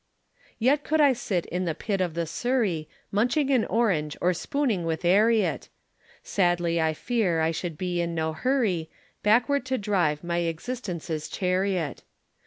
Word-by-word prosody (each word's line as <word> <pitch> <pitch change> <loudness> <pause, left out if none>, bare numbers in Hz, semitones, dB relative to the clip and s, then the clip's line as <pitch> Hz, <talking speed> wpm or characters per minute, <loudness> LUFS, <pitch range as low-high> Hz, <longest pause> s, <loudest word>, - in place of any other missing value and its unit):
Yet 275 +5 +2
could 315 +1 +1
I 285 -3 +6
sit 190 -7 -2
in 180 +1 -3
the 165 -3 -1
pit 200 +1 -2
of 175 -3 -1
the 170 0 -1
Surrey, 195 -4 -1 0.2
Munching 250 +7 +1
an 250 -4 +3
orange 180 -11 0
or 180 +1 +2
spooning 230 - -1
with 165 +1 -2
'Arriet; 215 +5 +3 0.5
Sadly 175 -3 +1
I 160 -1 +1
fear 190 -3 0
I 160 0 +2
should 165 -1 -4
be 180 -1 -1
in 170 0 -2
no 160 -1 -1
hurry 200 - 0 0.3
Backward 245 +6 +3
to 260 0 0
drive 180 -8 0
my 170 0 -1
existence's 170 -3 -4
chariot. 185 -4 -1
180 Hz, 155 wpm, -26 LUFS, 165-235 Hz, 0.5 s, I